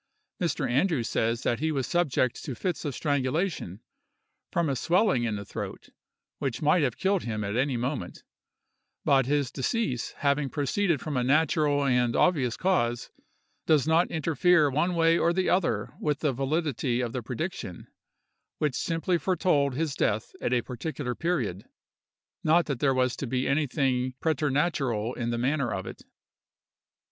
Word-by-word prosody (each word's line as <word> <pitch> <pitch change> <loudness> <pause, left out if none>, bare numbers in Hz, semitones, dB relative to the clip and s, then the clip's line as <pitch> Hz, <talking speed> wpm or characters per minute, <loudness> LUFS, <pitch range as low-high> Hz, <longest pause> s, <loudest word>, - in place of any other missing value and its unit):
Mr. 165 -5 0
Andrews 135 0 +1
says 115 +2 0
that 120 - 0
he 160 +2 0
was 135 -4 -1
subject 145 -8 0
to 135 - -5
fits 175 +6 -3
of 145 - -3
strangulation, 145 - -1 0.7
from 170 -1 +1
a 135 - 0
swelling 170 - +2
in 110 -2 -1
the 100 0 -6
throat, - - -7 0.5
which 130 -3 -2
might 150 +3 +3
have 125 -6 0
killed 190 -1 +1
him 110 -2 -3
at 100 +1 -3
any 130 0 +1
moment; 125 -6 -4 0.8
but 135 -2 +4
his 140 -3 +1
decease 135 - -2
having 140 -1 0
proceeded 155 +4 0
from 150 -2 -4
a 125 - +1
natural 145 +1 +2
and 125 -3 +2
obvious 135 -10 +2
cause, 120 -11 0 0.6
does 155 -4 +4
not 165 +2 +3
interfere 160 0 +3
one 170 +6 +1
way 165 0 +4
or 170 - +3
the 185 +1 +1
other 125 - 0
with 150 -2 -1
the 150 -4 +1
validity 135 -2 -1
of 120 -2 -2
the 125 - -2
prediction, 120 - -5 0.7
which 150 -3 0
simply 165 +6 0
foretold 150 -5 +1
his 155 0 -1
death 105 -5 0
at - - -1
a 125 -2 +2
particular 130 +1 -4
period, 120 - -2 0.8
not 165 +2 +4
that 140 -5 -3
there 135 -2 +2
was 130 -1 +1
to 135 - -5
be 130 +2 -1
anything 135 -3 0
preternatural 140 -6 0
in 120 -2 -3
the 120 - -1
manner 135 0 0
of 95 - -3
it. - - -8
140 Hz, 160 wpm, -27 LUFS, 125-160 Hz, 0.8 s, but